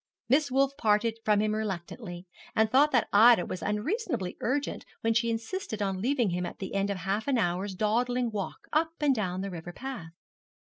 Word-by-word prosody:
Miss 285 +3 +3
Wolf 275 +1 +2
parted 220 +1 +2
from 210 -1 +3
him 215 0 +1
reluctantly, 190 -2 -5 0.3
and 220 0 +3
thought 290 +3 +5
that 245 -4 +3
Ida 220 -1 +7
was 185 - -5
unreasonably 220 - -2
urgent 280 +4 -1 0.2
when 225 0 +2
she 235 +1 +2
insisted 225 - -3
on 195 -2 -1
leaving 245 -4 +1
him 180 +1 -1
at - - -5
the 190 - -6
end 200 0 0
of 200 - -1
half 195 +6 -2
an 275 -3 +2
hour's 190 -1 -1
dawdling 240 +4 +1
walk 200 -3 -5
up 320 +2 +2
and 295 -2 +3
down 190 -6 -2
the 195 0 -4
river 175 0 -7
path. 250 -10 -6
220 Hz, 190 wpm, -29 LUFS, 195-250 Hz, 0.3 s, Ida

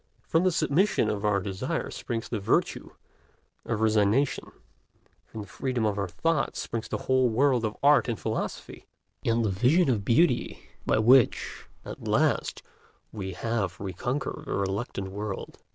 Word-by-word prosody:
From 165 +2 +1
the 185 - +3
submission 165 +5 +2
of 105 0 -4
our 105 -1 +2
desires 95 -1 -3
springs 115 -1 -4
the 115 - -3
virtue 100 - 0 0.8
of 110 - -2
resignation; 110 +5 +2 0.8
from 110 - -7
the 100 - -9
freedom 125 -4 -2
of 105 -1 0
our 100 - -1
thoughts 150 - -1
springs 115 -1 -4
the - - -2
whole 130 -1 +3
world 125 +1 +2
of 110 -1 -2
art 145 -1 +5
and 115 - -2
philosophy, - - -4 0.4
and 115 0 +1
the - - +1
vision 130 - +3
of 105 -5 -1
beauty 125 - +2 0.3
by - - +3
which, 120 +3 +3 0.2
at - - -8
last, - - +1 0.5
we 95 -3 -5
half 105 -5 -2
reconquer 120 - -3
the - - -4
reluctant 100 0 -3
world. 105 0 -6
115 Hz, 150 wpm, -27 LUFS, 100-130 Hz, 0.8 s, art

